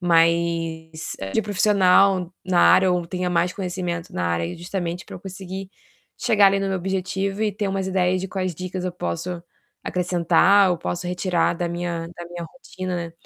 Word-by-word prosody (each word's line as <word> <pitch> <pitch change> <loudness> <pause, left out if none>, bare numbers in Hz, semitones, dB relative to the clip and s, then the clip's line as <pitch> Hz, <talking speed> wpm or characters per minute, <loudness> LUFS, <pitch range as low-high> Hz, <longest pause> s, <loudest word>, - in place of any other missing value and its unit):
mais 165 -2 +1 0.2
de 220 - +2
profissional 195 -2 +3
na 180 -1 +2
área 190 0 +6
ou 175 -1 0
tenha 180 0 -2
mais 175 +1 +1
conhecimento 180 -3 -4
na 90 - -2
área, 85 0 -1
justamente 175 0 -4
pra - - -9
eu - - -12
conseguir 190 0 -7 0.5
chegar 215 -5 +5
ali 195 0 +3
no 195 - -1
meu 190 - 0
objetivo 195 +2 -2
e 215 - +2
ter 205 +1 -2
umas 195 -1 -2
ideias 185 -1 +1
de 190 - -4
quais 185 -2 -2
dicas 185 +2 -5
eu 180 - -2
posso 170 - -4 0.4
acrescentar 180 +2 +3
ou 175 - 0
posso 175 +1 -3
retirar 180 -1 +1
da 175 0 -2
minha 170 -1 -3
da 175 - -8
minha 175 0 -7
rotina, 185 -2 -6
né. 165 - -12
180 Hz, 175 wpm, -23 LUFS, 170-190 Hz, 0.5 s, área